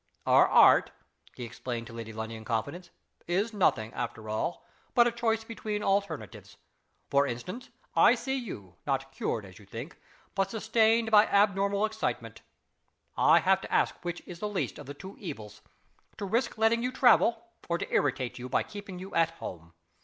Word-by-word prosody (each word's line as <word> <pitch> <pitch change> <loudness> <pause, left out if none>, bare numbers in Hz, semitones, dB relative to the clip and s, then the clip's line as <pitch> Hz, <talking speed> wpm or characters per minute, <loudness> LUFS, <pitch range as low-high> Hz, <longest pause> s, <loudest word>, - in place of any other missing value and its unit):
"Our - - +6
art," - - +6 0.5
he 125 - -7
explained 120 0 -5
to 115 - -11
Lady 115 -1 -7
Lundie 110 +1 -5
in 110 -1 -8
confidence, 145 +11 -3 0.4
"is 200 +6 0
nothing, 130 - +1
after 115 -3 -5
all, 110 +10 -2 0.3
but 240 - +7
a 240 - +2
choice 225 -1 0
between 215 -2 -4
alternatives. 195 - -2 0.5
For 140 0 +4
instance. 180 - -6 0.3
I - - +6
see 265 - -3
you 100 - -7
not 135 -1 -1
cured, 115 -5 -3
as 95 -1 -14
you 105 - -15
think 120 - -8 0.3
but 195 -1 0
sustained 225 +1 +2
by 210 0 +7
abnormal 200 0 +2
excitement. 220 0 -4 0.7
I - - +5
have - - +3
to - - -9
ask - - +2
which 175 -1 -4
is 175 -1 -9
the 210 - -2
least 205 - -3
of 145 - -10
the 145 - -7
two 190 +6 -10
evils 110 - -8 0.6
to 200 - -4
risk 230 +5 0
letting 225 +1 +3
you 250 +1 -1
travel, 235 -2 +4 0.2
or 170 - +1
to - - -6
irritate 130 -3 0
you 125 +1 -6
by - - +1
keeping 205 -3 -9
you 190 +2 -9
at 165 -1 +3
home. 85 -1 -8
180 Hz, 175 wpm, -29 LUFS, -, 0.7 s, but